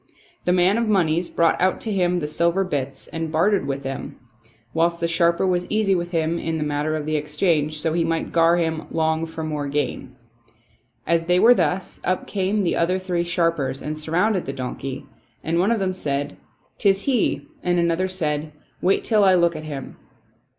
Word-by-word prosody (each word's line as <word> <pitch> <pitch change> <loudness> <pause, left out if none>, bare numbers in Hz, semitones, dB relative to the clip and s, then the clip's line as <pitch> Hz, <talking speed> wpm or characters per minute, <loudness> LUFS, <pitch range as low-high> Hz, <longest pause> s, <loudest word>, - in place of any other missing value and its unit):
The 180 - +3
man 185 +4 +3
of 230 - 0
moneys 175 -4 +2
brought 165 0 +2
out 185 +1 +2
to 220 - -3
him 180 -2 +1
the 150 - -2
silver 170 +5 +1
bits 140 -6 -3
and 165 -1 -4
bartered 190 +6 +2
them - - -7
with 140 0 -3
him, 135 0 -6 0.5
whilst 170 +1 +1
the 170 - 0
sharper 170 +1 +2
was 180 -1 0
easy 215 -2 +2
with 175 -1 -1
him 165 -1 0
in 165 0 -2
the 155 - -1
matter 150 +1 -1
of 155 -1 -3
the 155 0 -1
exchange, 150 0 0
so 160 +1 0
he 170 0 +1
might 165 0 -2
gar 165 +1 +4
him 160 -2 -1
long 160 0 0
for 160 0 -6
more 150 -2 -3
gain. 140 -2 -3 0.9
As 165 0 +1
they 180 +1 +3
were 240 +5 +7
thus, 180 -2 -1
up 185 0 -1
came 200 +1 0
the 175 - +1
other 180 +3 +1
three 180 -2 -1
sharpers 165 -6 0
and 150 +2 -4
surrounded 175 +6 0
the 135 - -4
donkey; 135 +1 -5 0.4
and 165 +1 0
one 190 +4 +3
of 235 - +2
them 190 -2 -1
said, 145 -4 -3 0.2
" - - -41
'Tis 195 -2 +3
he," 225 - 0
and 175 0 +1
another 170 +2 +1
said, 155 -5 -2 0.2
" 130 -1 -38
Wait 190 +2 +2
till 215 -3 +3
I 190 -1 +6
look 170 -1 +3
at 155 0 -6
him." 140 -3 -7
170 Hz, 205 wpm, -22 LUFS, 155-185 Hz, 0.9 s, were